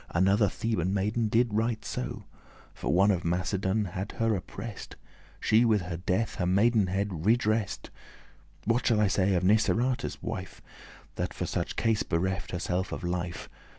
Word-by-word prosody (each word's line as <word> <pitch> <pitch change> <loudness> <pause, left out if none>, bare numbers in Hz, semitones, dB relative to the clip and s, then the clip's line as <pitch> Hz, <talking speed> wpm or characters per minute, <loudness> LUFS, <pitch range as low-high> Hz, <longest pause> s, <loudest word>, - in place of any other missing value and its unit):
Another 100 +4 +3
Theban 100 -4 -1
maiden 105 +4 0
did 115 +1 +2
right 110 +1 0
so; - - -4 0.5
For - - -3
one 95 +4 +5
of 90 -3 -1
Macedon 95 +4 0
had 95 +2 -5
her 115 -1 +1
oppress'd, 100 +3 -7 0.4
She 110 +2 +4
with 110 -4 +3
her 85 -2 -4
death 90 +5 -1
her 90 - 0
maidenhead 100 -3 +2
redress'd.* 110 -2 +1 0.7
*vindicated 115 - +1
What 120 - 0
shall 115 -3 +3
I 105 - +4
say 95 0 +2
of 90 - +1
Niceratus' 110 +5 +1
wife, 95 0 -5 0.6
That - - -3
for - - -2
such - - -3
case 115 -2 +1
bereft 95 +4 -1
herself 90 +1 -2
her - - -3
life? 90 -1 -3
100 Hz, 155 wpm, -28 LUFS, 90-110 Hz, 0.7 s, one